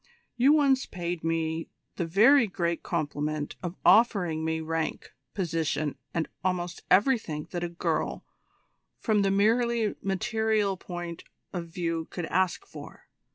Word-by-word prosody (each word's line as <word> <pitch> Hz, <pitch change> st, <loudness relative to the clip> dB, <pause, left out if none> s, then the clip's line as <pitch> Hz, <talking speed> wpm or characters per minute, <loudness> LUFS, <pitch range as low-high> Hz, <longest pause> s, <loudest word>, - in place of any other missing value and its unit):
You 255 Hz, +4 st, +5 dB
once 275 Hz, -4 st, +3 dB
paid 175 Hz, -1 st, -4 dB
me 165 Hz, 0 st, -1 dB, 0.3 s
the 170 Hz, -, -1 dB
very 230 Hz, -, +6 dB
great 170 Hz, -3 st, -1 dB
compliment 150 Hz, -2 st, -2 dB
of 175 Hz, 0 st, -4 dB
offering 180 Hz, -8 st, +4 dB
me 160 Hz, 0 st, 0 dB
rank, 160 Hz, 0 st, -3 dB, 0.2 s
position, 160 Hz, -5 st, -1 dB, 0.2 s
and 165 Hz, -2 st, -1 dB, 0.2 s
almost 180 Hz, -2 st, -2 dB
everything 185 Hz, -, +2 dB
that 175 Hz, -1 st, -3 dB
a 175 Hz, -, -2 dB
girl, 170 Hz, -, -2 dB, 0.7 s
from 215 Hz, -3 st, +1 dB
the 195 Hz, -, +2 dB
merely 225 Hz, +2 st, +2 dB
material 210 Hz, +1 st, 0 dB
point 175 Hz, -2 st, -7 dB, 0.3 s
of 175 Hz, -2 st, -4 dB
view 165 Hz, -2 st, -3 dB
could 175 Hz, -, -4 dB
ask 185 Hz, -, 0 dB
for. -, -, -12 dB
175 Hz, 130 wpm, -28 LUFS, 165-210 Hz, 0.7 s, very